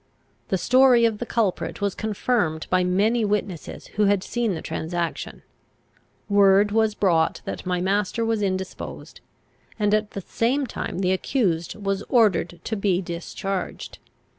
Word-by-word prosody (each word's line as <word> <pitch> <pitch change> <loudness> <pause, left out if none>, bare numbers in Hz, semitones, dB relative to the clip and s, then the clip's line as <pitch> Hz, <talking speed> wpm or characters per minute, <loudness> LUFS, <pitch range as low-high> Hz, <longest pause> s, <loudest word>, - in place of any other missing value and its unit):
The 190 - 0
story 250 +4 +5
of 220 -2 0
the 240 - -4
culprit 215 -6 -1
was 200 -1 0
confirmed 210 -7 -1
by 185 0 +3
many 210 +6 +2
witnesses 205 -5 -3
who 210 - +4
had 200 -1 +2
seen 235 -5 -1
the 160 - -5
transaction. 170 +1 -4 0.8
Word 200 0 +5
was 220 -1 +2
brought 170 -6 +2
that - - -6
my 180 -1 0
master 205 +4 0
was 225 -1 0
indisposed; 190 -1 -4 0.6
and, 210 -1 +1
at 215 0 +1
the - - -2
same 255 +9 0
time, 195 - -4
the 185 -1 +2
accused 185 - 0
was 195 -1 -2
ordered 185 -8 +2
to 220 - -2
be 195 -3 +1
discharged. 180 +2 -5
200 Hz, 145 wpm, -24 LUFS, 180-220 Hz, 0.8 s, story